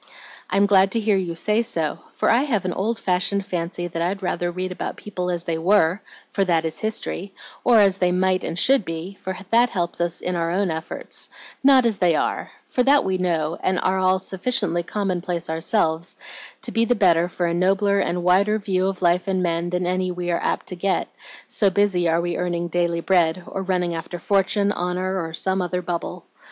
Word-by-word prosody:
"I'm 200 Hz, +2 st, +3 dB
glad 195 Hz, -1 st, +4 dB
to 230 Hz, -, +1 dB
hear 215 Hz, -2 st, +2 dB
you 180 Hz, -3 st, -2 dB
say 210 Hz, +6 st, +1 dB
so, 165 Hz, -10 st, -2 dB, 0.2 s
for -, -, +2 dB
I 235 Hz, -, +4 dB
have 235 Hz, -10 st, 0 dB
an 180 Hz, -, -1 dB
old 220 Hz, +4 st, -1 dB
fashioned 190 Hz, 0 st, 0 dB
fancy 175 Hz, 0 st, -3 dB
that 165 Hz, -1 st, -4 dB
I'd 190 Hz, +3 st, -2 dB
rather 175 Hz, -1 st, -1 dB
read 185 Hz, +1 st, -4 dB
about 180 Hz, -, -5 dB
people 180 Hz, -3 st, -4 dB
as 175 Hz, -1 st, -2 dB
they 165 Hz, -2 st, -2 dB
were, 185 Hz, +1 st, +3 dB, 0.3 s
for 195 Hz, -, +1 dB
that 165 Hz, -3 st, +1 dB
is 160 Hz, 0 st, -3 dB
history, 215 Hz, -3 st, -4 dB, 0.3 s
or 240 Hz, -2 st, +5 dB
as 195 Hz, -2 st, +4 dB
they 180 Hz, -1 st, +2 dB
might 185 Hz, 0 st, +1 dB
and 165 Hz, -, -3 dB
should 270 Hz, +3 st, +4 dB
be, 170 Hz, +3 st, -6 dB
for 190 Hz, -1 st, -4 dB
that 240 Hz, +2 st, +5 dB
helps 175 Hz, -3 st, -3 dB
us 175 Hz, 0 st, -1 dB
in 180 Hz, -, -2 dB
our 165 Hz, -1 st, 0 dB
own 185 Hz, +1 st, 0 dB
efforts; 160 Hz, +1 st, -4 dB, 0.3 s
not 265 Hz, -2 st, +6 dB
as 220 Hz, -4 st, +1 dB
they 175 Hz, -3 st, +3 dB
are, -, -, -1 dB, 0.2 s
for 250 Hz, -, 0 dB
that 275 Hz, +3 st, +4 dB
we 190 Hz, -1 st, -1 dB
know, 165 Hz, -3 st, 0 dB
and 185 Hz, -1 st, +1 dB
are 190 Hz, +1 st, +1 dB
all 185 Hz, 0 st, +3 dB
sufficiently 190 Hz, -1 st, 0 dB
commonplace 180 Hz, -3 st, -3 dB
ourselves, 165 Hz, 0 st, 0 dB, 0.5 s
to -, -, -3 dB
be 230 Hz, -, +2 dB
the 245 Hz, +2 st, +2 dB
better 175 Hz, -4 st, +3 dB
for 180 Hz, -, -2 dB
a 170 Hz, -, 0 dB
nobler 195 Hz, +3 st, +2 dB
and 180 Hz, -2 st, -1 dB
wider 195 Hz, +4 st, +3 dB
view 190 Hz, -3 st, 0 dB
of 190 Hz, -1 st, -3 dB
life 175 Hz, +2 st, +2 dB
and 185 Hz, -1 st, 0 dB
men 170 Hz, 0 st, -1 dB
than 180 Hz, 0 st, -1 dB
any 185 Hz, +1 st, 0 dB
we 175 Hz, -1 st, -3 dB
are 170 Hz, -, 0 dB
apt -, -, -1 dB
to 180 Hz, -, -5 dB
get, 190 Hz, +2 st, -1 dB, 0.4 s
so 200 Hz, -, +2 dB
busy 185 Hz, -3 st, +2 dB
are 165 Hz, +1 st, +2 dB
we 175 Hz, 0 st, -2 dB
earning 175 Hz, -1 st, -2 dB
daily 170 Hz, 0 st, 0 dB
bread, 175 Hz, -1 st, +2 dB
or 195 Hz, -, -5 dB
running 180 Hz, -2 st, -1 dB
after 165 Hz, +2 st, -5 dB
fortune, 200 Hz, +2 st, +1 dB
honor 185 Hz, +1 st, -2 dB
or 165 Hz, -, -5 dB
some 190 Hz, +3 st, 0 dB
other 180 Hz, 0 st, -2 dB
bubble. 170 Hz, -1 st, -4 dB
185 Hz, 210 wpm, -22 LUFS, 175-195 Hz, 0.5 s, not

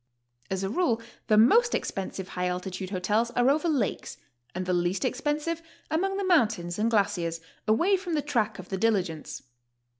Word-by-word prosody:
As 190 Hz, 0 st, -2 dB
a 195 Hz, -, -1 dB
rule, 245 Hz, -6 st, +1 dB, 0.3 s
the 215 Hz, -, +4 dB
most 455 Hz, -, +5 dB
expensive 190 Hz, -1 st, -4 dB
high 180 Hz, 0 st, -2 dB
altitude 180 Hz, +1 st, -4 dB
hotels 210 Hz, +5 st, 0 dB
are 245 Hz, +2 st, +4 dB
over 310 Hz, +4 st, +1 dB
lakes 265 Hz, -10 st, -1 dB, 0.4 s
and 185 Hz, 0 st, -2 dB
the 180 Hz, -, 0 dB
least 175 Hz, +7 st, 0 dB
expensive 295 Hz, +5 st, -1 dB, 0.3 s
among 390 Hz, +5 st, 0 dB
the 400 Hz, -, -1 dB
mountains 215 Hz, -, +2 dB
and 220 Hz, +2 st, +2 dB
glaciers, 195 Hz, -6 st, 0 dB, 0.3 s
away 340 Hz, -, +4 dB
from 360 Hz, -2 st, -5 dB
the 295 Hz, -, 0 dB
track 230 Hz, -7 st, 0 dB
of 185 Hz, -, -10 dB
the 190 Hz, -, -2 dB
diligence. 190 Hz, -7 st, -1 dB
215 Hz, 170 wpm, -27 LUFS, 185-295 Hz, 0.4 s, most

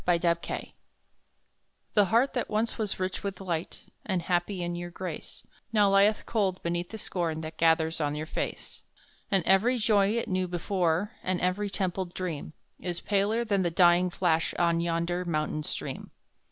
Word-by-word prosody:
Etheline 170 Hz, -1 st, 0 dB, 1.2 s
The 205 Hz, -2 st, +5 dB
heart 230 Hz, +8 st, +3 dB
that 245 Hz, -, -2 dB
once 225 Hz, +2 st, -1 dB
was 210 Hz, -4 st, -2 dB
rich 185 Hz, 0 st, -2 dB
with 195 Hz, -2 st, -4 dB
light, 175 Hz, -4 st, -3 dB, 0.2 s
And 185 Hz, -4 st, -1 dB
happy 180 Hz, +1 st, 0 dB
in 175 Hz, 0 st, -2 dB
your 175 Hz, 0 st, -5 dB
grace, 175 Hz, -2 st, -7 dB, 0.3 s
Now 205 Hz, -3 st, +4 dB
lieth 200 Hz, +2 st, +4 dB
cold 195 Hz, -5 st, 0 dB
beneath 175 Hz, +1 st, -2 dB
the 220 Hz, -, -6 dB
scorn 170 Hz, -6 st, -2 dB
That 160 Hz, 0 st, -8 dB
gathers 160 Hz, 0 st, +3 dB
on 145 Hz, 0 st, 0 dB
your 155 Hz, +1 st, -3 dB
face; -, -, -5 dB, 0.5 s
And 195 Hz, -3 st, +2 dB
every 210 Hz, +9 st, +4 dB
joy 210 Hz, -3 st, +3 dB
it 235 Hz, -, -1 dB
knew 185 Hz, -1 st, 0 dB
before, 175 Hz, +2 st, 0 dB
And 185 Hz, -1 st, -1 dB
every 185 Hz, +3 st, 0 dB
templed 185 Hz, -2 st, -2 dB
dream, 165 Hz, -4 st, -4 dB, 0.3 s
Is 175 Hz, -2 st, -4 dB
paler 210 Hz, +3 st, +1 dB
than 200 Hz, -3 st, +1 dB
the 175 Hz, -, +1 dB
dying 175 Hz, +1 st, +5 dB
flash 165 Hz, -2 st, +1 dB
On 170 Hz, -1 st, +2 dB
yonder 170 Hz, +1 st, 0 dB
mountain 155 Hz, -2 st, -1 dB
stream. -, -, -5 dB
180 Hz, 165 wpm, -28 LUFS, 170-200 Hz, 1.2 s, The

